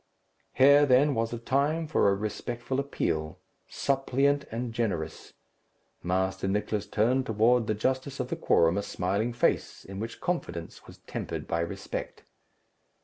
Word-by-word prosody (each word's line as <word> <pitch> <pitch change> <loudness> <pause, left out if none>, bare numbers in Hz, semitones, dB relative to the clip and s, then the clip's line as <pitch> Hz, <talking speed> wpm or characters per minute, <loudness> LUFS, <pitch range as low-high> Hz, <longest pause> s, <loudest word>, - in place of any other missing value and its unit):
Here 140 +2 +6
then 135 +3 +5
was 115 -1 -1
a 120 - -3
time 140 +7 0
for 150 -9 +3
a 100 - +2
respectful 120 +5 -3
appeal, 80 - -2 0.3
suppliant 140 +1 +1
and 115 +1 -4
generous. 95 -10 -3 0.7
Master 95 +2 -1
Nicless 105 +1 -1
turned 125 +5 +1
toward 115 +2 +3
the 110 - +1
justice 130 +5 -1
of 130 -1 -2
the - - -1
quorum 85 +4 +3
a - - -1
smiling 100 +4 -1
face, 120 - 0
in 95 0 -7
which 115 +2 -5
confidence 85 - -4
was - - -13
tempered - - -5
by 85 - -1
respect. 85 - -5
115 Hz, 145 wpm, -28 LUFS, 100-135 Hz, 0.7 s, Here